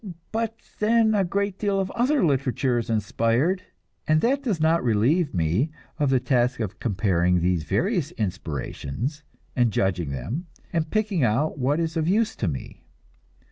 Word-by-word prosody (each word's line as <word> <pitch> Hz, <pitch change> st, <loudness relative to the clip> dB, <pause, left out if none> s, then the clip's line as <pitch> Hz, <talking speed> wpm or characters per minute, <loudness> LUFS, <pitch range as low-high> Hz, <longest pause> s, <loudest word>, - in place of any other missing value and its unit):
But 225 Hz, 0 st, -2 dB, 0.2 s
then, 220 Hz, 0 st, +4 dB
a 200 Hz, -2 st, +3 dB
great 200 Hz, +1 st, -1 dB
deal 200 Hz, -2 st, +1 dB
of 190 Hz, -1 st, -1 dB
other 255 Hz, 0 st, +2 dB
literature 135 Hz, -3 st, +1 dB
is 115 Hz, 0 st, -5 dB
inspired, 115 Hz, -, +1 dB, 0.5 s
and 155 Hz, 0 st, +4 dB
that 270 Hz, +4 st, +2 dB
does 220 Hz, -11 st, -1 dB
not 160 Hz, +2 st, +3 dB
relieve 125 Hz, -, +2 dB
me 90 Hz, -, +1 dB, 0.3 s
of 145 Hz, -2 st, +2 dB
the 130 Hz, -1 st, +3 dB
task 125 Hz, -1 st, +1 dB
of 105 Hz, -3 st, -4 dB
comparing 90 Hz, -5 st, +1 dB
these 85 Hz, -2 st, 0 dB
various 155 Hz, -, 0 dB
inspirations, 95 Hz, -, -4 dB, 0.3 s
and 120 Hz, -2 st, +3 dB
judging 90 Hz, -6 st, 0 dB
them, 105 Hz, -, -4 dB, 0.3 s
and 160 Hz, -2 st, 0 dB
picking 210 Hz, -6 st, 0 dB
out 130 Hz, +7 st, +1 dB
what 140 Hz, +5 st, +1 dB
is 165 Hz, 0 st, -1 dB
of 160 Hz, 0 st, 0 dB
use 220 Hz, +4 st, +2 dB
to 105 Hz, -, -1 dB
me. 70 Hz, -5 st, -5 dB
140 Hz, 160 wpm, -25 LUFS, -, 0.5 s, then